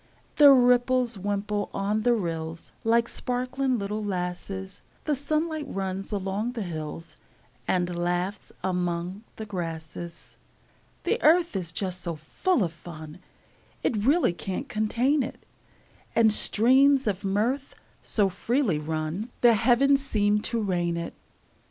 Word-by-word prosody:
The 295 -2 +9
ripples 250 -1 +4
wimple 205 +1 -2
on 205 +2 0
the 240 +2 +3
rills, 165 -4 -4
Like 230 +1 +3
sparkling 255 +2 -1
little 210 +1 -3
lasses; 190 0 -4 0.2
The 300 - 0
sunlight 310 +2 -1
runs 195 -2 -4
along 205 +4 -2
the 230 -4 -3
hills, 165 -1 -6 0.5
And 180 -1 0
laughs 175 +3 -2
among 180 +1 -2
the 220 - -6
grasses. 170 -3 -7 0.7
The 470 - 0
earth 335 - +4
is 175 -4 -3
just 185 +1 -3
so 170 -1 -3
full 225 - 0
of 165 -2 -2
fun 160 -1 -10 0.6
It - - +1
really 260 - +3
can't 190 - -5
contain 240 +6 +1
it; 250 - -6 0.7
And 220 -2 +5
streams 265 +6 +4
of 200 -2 -1
mirth 225 +8 -1 0.3
so 205 -3 +1
freely 215 - 0
run 155 +7 -3
The 240 -1 +7
heavens 260 +5 +4
seem 210 -5 +2
to 235 - -1
rain 175 -5 0
it. 170 - -4
205 Hz, 130 wpm, -26 LUFS, 180-245 Hz, 0.7 s, The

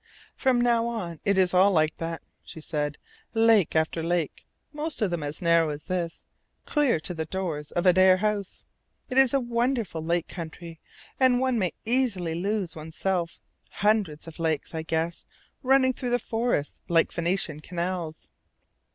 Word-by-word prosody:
"From 260 -3 +2
now 235 -1 +3
on 180 -9 -4
it 200 -1 +2
is 185 -1 +4
all 185 +2 +6
like 155 -4 +2
that." 165 -1 -5 0.2
she - - -10
said. 150 -2 -3 0.4
"Lake 225 -6 +4
after 160 +1 +1
lake, 170 -2 -2 0.3
most 305 +2 -3
of 210 -6 +1
them 170 -2 -2
as 145 +3 -4
narrow 170 -1 +4
as 150 0 -5
this, 175 -2 -3 0.4
clear 290 - +2
to 180 - -4
the 160 -1 -3
doors 160 -4 -4
of 175 - 0
Adare 185 +1 +6
House. 205 -1 -2 0.5
It 260 - +4
is 270 -3 +6
a 275 - +3
wonderful 235 -8 -1
lake 170 +1 0
country, 165 -1 -8 0.4
and 255 -2 +4
one 260 -2 +1
may 185 -4 0
easily 220 -9 0
lose 195 +1 -2
one's 160 0 -9
self 180 -3 -1 0.3
hundreds 200 -8 0
of 165 +1 -10
lakes, 160 -2 -1
I 160 - -2
guess, 165 +1 -2 0.3
running 260 -1 +4
through 250 0 -4
the 245 - +3
forests 225 -10 -2
like 165 -1 +3
Venetian 170 -3 -1
canals." 170 -1 -4
180 Hz, 165 wpm, -26 LUFS, 165-230 Hz, 0.5 s, all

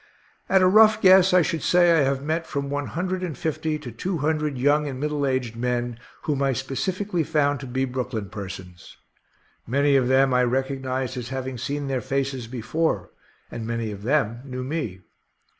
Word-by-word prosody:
At 190 -1 +5
a - - +6
rough 215 +2 +6
guess, 190 -1 +6
I 180 -1 +5
should 160 0 -2
say 175 +2 +4
I 165 -2 +4
have 135 0 0
met 160 +2 -2
from 140 -1 -3
one 145 0 -2
hundred 185 +2 -2
and 170 -7 -4
fifty 155 +1 -2
to 140 -5 -8
two 175 - -3
hundred 150 -1 -1
young 145 +3 +2
and 130 -2 -5
middle 150 -1 -1
aged 130 -4 -1
men 120 0 -2 0.2
whom 145 -3 -1
I 135 -1 +2
specifically 175 - -2
found 145 -2 +1
to 135 - -7
be 130 +2 -1
Brooklyn 125 -5 -4
persons. 95 -4 -9 0.7
Many 140 +3 +3
of 130 -2 +3
them 135 0 +4
I 125 0 +4
recognized 130 0 -1
as 120 -1 -5
having 130 -1 -4
seen 140 +3 -3
their 130 -2 -1
faces 135 -1 -2
before, 130 +7 -2 0.4
and 115 - -5
very 115 +1 -3
many 115 -2 -3
of 100 -1 -8
them 120 -2 +1
knew 130 -2 -5
me. 130 - -4
135 Hz, 190 wpm, -24 LUFS, 125-155 Hz, 0.7 s, a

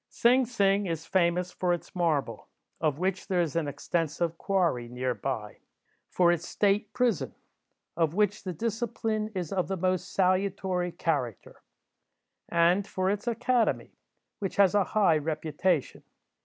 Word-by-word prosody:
Sing 250 +1 +3
Sing 200 -4 +2
is 165 -1 -3
famous 180 0 +1
for 180 -1 0
its 175 - -6
marble, 165 -6 -1 0.3
of 155 -3 0
which 185 +2 -2
there 185 -3 +1
is 165 -4 0
an 165 -3 0
extensive 165 +2 -2
quarry 170 -12 0
near 125 +1 -2
by; 110 -6 -4 0.5
for 175 -1 +4
its 175 -1 -2
State 205 0 +1
prison, 245 -8 0 0.6
of 165 -1 +1
which 210 0 +1
the 185 - -3
discipline 220 +2 -2
is 180 -1 -3
of 185 -2 0
the 195 - -2
most 185 0 -1
salutary 185 -1 +1
character; 145 - -3 0.9
and 175 +4 +3
for 185 +1 0
its 205 +3 -4
academy, 235 0 +1 0.5
which 195 -2 -3
has 195 -3 +5
a 205 -2 +3
high 185 -7 +3
reputation. 155 +1 -1
180 Hz, 140 wpm, -28 LUFS, 165-200 Hz, 0.9 s, has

